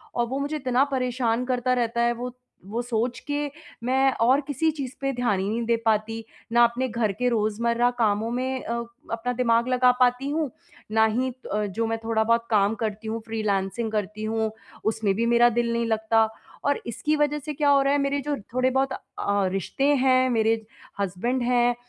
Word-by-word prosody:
और 240 - +2
वो 265 +3 -3
मुझे 285 +2 -2
इतना 260 -3 +2
परेशान 250 -2 0
करता 255 0 +1
रहता 235 -1 0
है। 235 0 +3
वो 245 +1 -6 0.3
वो 225 +4 -2
सोच 240 0 -1
के 290 0 -1 0.4
मैं 265 +2 +3
और 255 +5 +4
किसी 300 +3 +1
चीज़ 265 -3 -4
पे 275 0 0
ध्यान 240 -6 +1
ही 190 - -1
नहीं 230 +2 -1
दे 235 0 +3
पाती, 225 +1 0 0.3
ना 240 +1 +6
अपने 235 +2 +2
घर 230 -3 0
के 250 - +2
रोज़मर्रा 235 +2 +1
कामों 220 0 +1
में 260 +1 -2
अ, 235 - -3 0.4
अपना 230 +2 -2
दिमाग 235 -1 +2
लगा 250 0 +4
पाती 250 +2 +2
हूँ, 305 -1 -1 0.4
ना 220 0 +4
ही 245 +4 0 0.2
अ, 210 0 0
जो 205 +3 -2
मैं 225 0 -1
थोड़ा 225 -1 +1
बहुत 230 +1 +1
काम 210 -1 +3
करती 215 0 -3
हूँ 225 +1 -2
फ्रीलांसिंग 215 0 -1
करती 210 0 -3
हूँ 220 0 -1 0.3
उसमें 220 -2 +1
भी 230 +3 0
मेरा 235 +1 +5
दिल 235 -1 0
नहीं 235 0 0
लगता। 220 0 +2 0.4
और 285 0 +1
इसकी 235 +7 -1
वज़ह 295 0 +1
से 305 - -3
क्या 290 0 +1
हो 280 -1 +5
रहा 275 +1 +2
है 290 - +2
मेरे 280 0 0
जो 290 +1 -2 0.2
थोड़े-बहुत 260 +1 +1
अ, - - -4 0.6
रिश्ते 195 +7 -1
हैं, 255 -1 +3
मेरे 225 -1 +2 0.4
हस्बैंड 200 +7 -1
हैं 245 0 +3
235 Hz, 195 wpm, -25 LUFS, 225-255 Hz, 0.6 s, ना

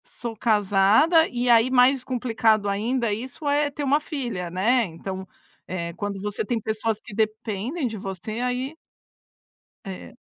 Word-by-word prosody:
Sou 240 - -6
casada, 215 - +4
e 245 0 -2
aí 235 0 +5
mais 255 +1 +4
complicado 225 -4 +1
ainda 225 +3 0
isso, 255 +7 -6
é 290 0 +2
ter 290 +1 -5
uma 285 +2 +3
filha, 240 - -4
né. 225 +8 +2
Então, 190 +2 -7 0.4
eh, 170 -2 -4
quando 200 +2 -4
você 205 +1 -3
tem 230 +2 -1
pessoas 220 0 -2
que 215 - -12
dependem 220 - -2
de 225 -3 -3
você, 195 +3 -5
aí 250 +4 -2 1.1
É. 190 -1 -8
225 Hz, 145 wpm, -24 LUFS, 200-255 Hz, 1.1 s, aí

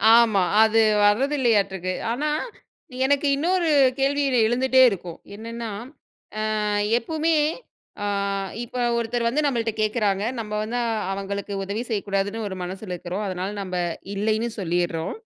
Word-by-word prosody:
ஆமா. 225 -4 +5 0.2
அது 220 0 +4 0.2
வரது 260 +8 +3
இல்லையாட்டுக்கு. 195 -6 +1 0.2
ஆனா 290 +6 -1 0.8
எனக்கு 285 +1 +2
இன்னொரு 340 +3 +1 0.3
கேள்வி 280 +1 +2 0.3
எழுந்துட்டே 260 +2 +3
இருக்கும். 180 -5 -6 0.2
என்னன்னா, 230 +1 -6 0.9
அ - - -1 0.4
எப்பவுமே 315 +6 0 0.7
அ - - -1 0.6
இப்ப 245 +1 -6 0.2
ஒருத்தர் 235 0 -1
வந்து 295 +5 0
நம்மள்ட 235 -4 0
கேக்குறாங்க. 210 -3 +1 0.2
நம்ம 210 -1 -6
வந்து 235 +3 -3 0.3
அவங்களுக்கு 200 +1 -4
உதவி 200 +4 -3
செய்யக் 210 -3 -2
கூடாதுன்னு 200 +3 -1
ஒரு 190 - -6
மனசுல 190 +2 -6
இருக்கறோம். 180 +5 -4
அதனால 185 +2 -3
நம்ம 185 -1 -4 0.4
இல்லைன்னு 220 +3 0
சொல்லிர்றோம். 175 -2 -1
220 Hz, 125 wpm, -24 LUFS, 195-245 Hz, 0.9 s, ஆமா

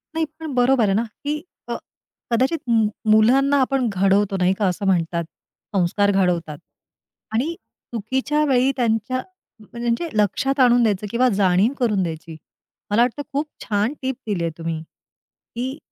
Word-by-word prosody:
नाही 325 0 +1
पण 315 -3 -5
बरोबर 250 0 +3
आहे 195 - +2
ना, 220 +4 +2 0.2
की 295 +1 -1 0.3
अ, - - -3 0.6
कदाचित 260 +8 +2
मु 225 -2 +4 0.2
मुलांना 265 +6 +5
आपण 260 -1 +1
घडवतो, 195 0 +2
नाही 185 +1 +3
का 205 - +2
असं 185 +3 -2
म्हणतात, 170 -2 +1 0.5
संस्कार 200 +2 +2
घडवतात 175 -6 0 0.8
आणि 270 +9 0 0.4
चुकीच्या 260 +7 0
वेळी 265 -1 +3
त्यांच्या 235 +1 0 0.5
त्यांच्या 235 +6 -1
लक्षात 270 +7 0
आणून 245 -1 +5
द्यायचं 210 -2 0
किंवा 250 +2 +3
जाणीव 195 +5 +3
करून 210 -6 +1
द्यायची. 165 -1 -6 0.6
मला 215 +3 +4
वाटतं 245 +4 +1
खूप 285 +3 0 0.2
छान 210 +4 0
टिप 265 0 -2
दिली 195 -5 -1
आहे 165 - -1
तुम्ही, 165 -1 -4 0.7
की 260 +4 -3
225 Hz, 145 wpm, -22 LUFS, 195-260 Hz, 0.8 s, मुलांना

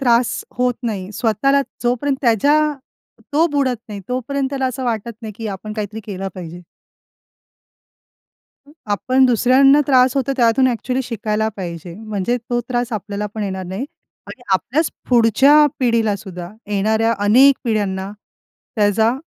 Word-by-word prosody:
त्रास 240 -2 +2
होत 250 0 +2
नाही, 205 -5 -4
स्वतःला 230 +6 +1 0.2
जोपर्यंत 250 +3 0
त्याच्या, 250 +5 +3 0.7
तो 315 +3 +4
बुडत 270 -4 +1
नाही 205 -2 -6
तोपर्यंत 265 +2 -2
त्याला 270 -2 -1
असं 255 +1 -4
वाटत 235 -1 -2
नाही 220 -1 -6
की 225 -1 -5
आपण 205 +2 -6
काहीतरी 215 0 -5
केलं 195 -2 -4
पाहिजे. 175 -1 -8 2.0
अ, - - -18 0.2
आपण 255 +6 +2
दुसऱ्यांना 260 +4 +5
त्रास 255 -1 +4
होतो 275 0 0
त्यातून 240 +1 +3
एक्चुअली 255 +1 -1
शिकायला 220 -2 -2
पाहिजे. 170 -2 -6
म्हणजे 215 +2 -2
तो 240 0 +1
त्रास 245 -1 -2
आपल्याला 210 0 -3
पण 215 - -3
येणार 190 -2 -4
नाही. 190 +8 -4 0.4
आणि 245 - -11
आपल्याच 285 - +1 0.2
पुढच्या 245 +4 +5 0.2
पिढीला 230 -4 +2
सुद्धा, 180 -4 -8 0.2
येणाऱ्या 220 +3 +1
अनेक 260 +7 +6
पिढ्यांना, 200 -4 -1 0.7
त्याचा 215 +2 +3
230 Hz, 135 wpm, -19 LUFS, 205-255 Hz, 2.0 s, अनेक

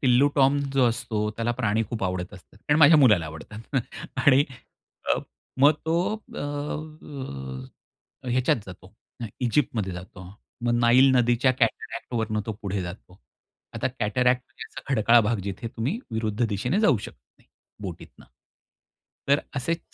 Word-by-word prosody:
Tillu 130 +1 +4
Tom 140 +1 +4
जो 135 -2 +4
असतो, 110 -2 -2
त्याला 115 +1 0
प्राणी 110 -2 0
खूप 115 -4 -4
आवडत 90 +1 -3
असतात 95 +1 -16
कारण 150 +6 +1
माझ्या 155 +1 +8
मुलाला 105 - +5
आवडतात 110 - -10 0.4
आणि 140 0 +5 0.7
अ, - - -2 0.4
मग 145 +2 +7
तो 170 +6 +1
अ, 220 - -9 1.9
ह्याच्यात 130 +1 +2
जातो, 95 +1 -12 0.5
इजिप्तमध्ये 115 -6 0
जातो. 90 +1 -9 0.4
मग 120 - +2
नाईल 125 +3 +6
नदीच्या 120 +1 +3
कॅटरॅक्ट 115 +1 -2
वरून 110 -2 0
तो 110 - -2
पुढे 100 -1 -2
जातो. 90 +1 -9 0.6
आता - - -1
कॅटरॅक्ट 125 +3 +2
म्हणजे 135 - -10
खडकाळ 120 -3 +5
भाग 115 +1 +1
जिथे 100 +4 -4
तुम्ही 130 - -3
विरुद्ध 110 +1 -1
दिशेने 125 - 0
जाऊ 145 - +4
शकत - - -9 0.2
नाही, - - -28 0.3
बोटीतनं. - - -9 1.0
तर 140 +1 +4 0.2
असेच 165 +5 -1
120 Hz, 135 wpm, -25 LUFS, 105-135 Hz, 1.9 s, माझ्या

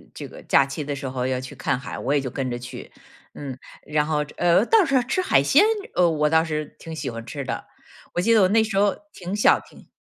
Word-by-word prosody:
这 - - -7
个 - - -12
假 140 - +4
期 140 +3 -5
的 145 0 -4
时 140 -1 -5
候 130 -1 -2
要 130 -1 -1
去 130 0 -9
看 - - -1
海， - - -7
我 135 - -1
也 145 - +3
就 135 -2 -4
跟 130 0 -3
着 120 - -3
去， 120 0 -9 0.4
嗯。 135 -3 -7 0.3
然 150 0 0
后， 150 -1 0
呃， 175 +4 +4
倒 440 - +5
是 275 -3 +2
吃 265 +10 -1
海 140 - +3
鲜， 285 - +5 0.3
呃， 175 -1 +4
我 150 -2 +1
倒 160 +1 +4
是 155 -2 -4
挺 165 -1 -8
喜 155 - -4
欢 115 -1 -7
吃 140 +3 -6
的， - - -4 0.5
我 175 - +1
记 230 +5 +3
得 220 - +5
我 185 - +5
那 220 +3 +3
时 215 -3 -3
候 200 0 +3 0.2
挺 185 +2 -5
小 210 - +4
挺 - - -18
150 Hz, 270 characters per minute, -23 LUFS, 135-195 Hz, 0.5 s, 倒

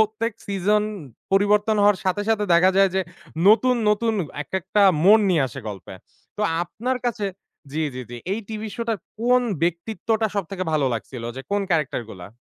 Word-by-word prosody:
প্রত্যেক 220 +2 0
সিজন 200 +2 +1 0.5
পরিবর্তন 210 +2 +3
হওয়ার 205 -1 +4
সাথে, 190 +2 0
সাথে 215 -2 +2
দেখা 185 +2 +5
যায় 195 0 +6
যে, 190 - +2 0.5
নতুন, 250 +4 +5
নতুন 225 +2 +2 0.3
এক 135 - -21
একটা 190 +3 +1 0.2
মোড় 215 +3 +7
নিয়ে 165 -6 +3
আসে 115 - -8
গল্পে। 95 -3 -8 0.4
তো 210 - -2 0.2
আপনার 235 +9 -3
কাছে 215 -3 -1 0.5
জি, 160 +2 -1
জি, 130 - -5
জি। 120 - -6 0.2
এই 215 - -2
টিভিশো 220 +1 -5
টার 225 -2 0 0.2
কোন 250 +1 +4 0.2
ব্যক্তিত্বটা 220 +6 0
সবথেকে 190 -1 -3
ভালো 150 -3 +2
লাগছিল 115 +2 -6
যে, - - -4
কোন 205 0 +1
ক্যারেক্টারগুলা? 120 - -2
205 Hz, 165 wpm, -23 LUFS, 170-220 Hz, 0.5 s, মোড়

